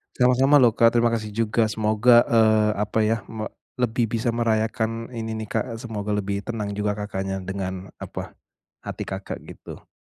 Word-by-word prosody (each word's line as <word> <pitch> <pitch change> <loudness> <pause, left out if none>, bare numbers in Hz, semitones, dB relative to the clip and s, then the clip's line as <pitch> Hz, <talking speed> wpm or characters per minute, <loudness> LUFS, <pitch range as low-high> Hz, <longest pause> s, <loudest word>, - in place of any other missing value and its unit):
Sama-sama 130 +3 +4
loh, 120 -2 +6
Kak. 115 +1 +3
Terima 120 0 +3
kasih 110 -2 -3
juga, 115 0 +1
semoga, 110 +3 +4
eee, 110 -2 +4
apa 105 +1 0
ya, 110 +1 +2
me 110 -1 -5 0.3
lebih 120 -2 0
bisa 115 0 0
merayakan 115 0 -1
ini 110 -1 -4
nih, - - -8
Kak. 110 - 0 0.2
Semoga 105 -3 -5
lebih 100 -1 -2
tenang 105 -4 -3
juga 105 0 -1
Kakaknya 95 -2 -4
dengan, 95 0 -5
apa, - - -6 0.5
hati - - -4
Kakak 95 +1 -5
gitu. - - -11
110 Hz, 160 wpm, -24 LUFS, 105-115 Hz, 0.5 s, loh